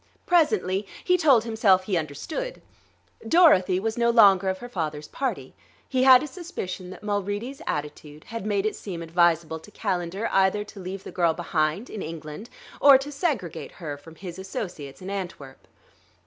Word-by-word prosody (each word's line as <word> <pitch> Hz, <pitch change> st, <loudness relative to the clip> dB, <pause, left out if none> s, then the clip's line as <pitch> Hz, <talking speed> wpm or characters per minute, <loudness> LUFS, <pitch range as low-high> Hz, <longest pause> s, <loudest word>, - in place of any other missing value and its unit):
Presently 210 Hz, -, +2 dB, 0.2 s
he 360 Hz, -, +3 dB
told 285 Hz, -10 st, +4 dB
himself 220 Hz, -5 st, +3 dB
he 190 Hz, 0 st, -1 dB
understood. 170 Hz, -, -4 dB, 0.7 s
Dorothy 195 Hz, -, +5 dB
was 225 Hz, +3 st, -2 dB
no 235 Hz, 0 st, +3 dB
longer 200 Hz, -5 st, +6 dB
of 190 Hz, -, -1 dB
her 245 Hz, -, -8 dB
father's 155 Hz, -9 st, -4 dB
party; 270 Hz, -, -4 dB, 0.3 s
he 260 Hz, -1 st, 0 dB
had 260 Hz, 0 st, +8 dB
a -, -, -4 dB
suspicion 195 Hz, -, -6 dB
that 185 Hz, -, -11 dB
Mulready's 205 Hz, +5 st, -3 dB
attitude 150 Hz, 0 st, -5 dB
had 230 Hz, -3 st, -6 dB
made 205 Hz, -1 st, 0 dB
it 215 Hz, -, -1 dB
seem 175 Hz, -5 st, -6 dB
advisable 165 Hz, -1 st, +2 dB
to 160 Hz, -, -15 dB
Calendar 190 Hz, -1 st, -2 dB
either 195 Hz, +2 st, +3 dB
to 210 Hz, -1 st, -12 dB
leave 190 Hz, +1 st, -6 dB
the -, -, -8 dB
girl 170 Hz, -3 st, +1 dB
behind, 165 Hz, +5 st, -1 dB
in 210 Hz, -, -7 dB
England, 160 Hz, +6 st, -7 dB, 0.3 s
or 280 Hz, -1 st, +8 dB
to 275 Hz, +2 st, -6 dB
segregate 275 Hz, -, -3 dB
her 155 Hz, -5 st, -6 dB
from 160 Hz, +3 st, -14 dB
his 180 Hz, +1 st, -8 dB
associates 180 Hz, -7 st, -6 dB
in 190 Hz, -, -5 dB
Antwerp. 175 Hz, -9 st, -7 dB
190 Hz, 165 wpm, -25 LUFS, 170-230 Hz, 0.7 s, had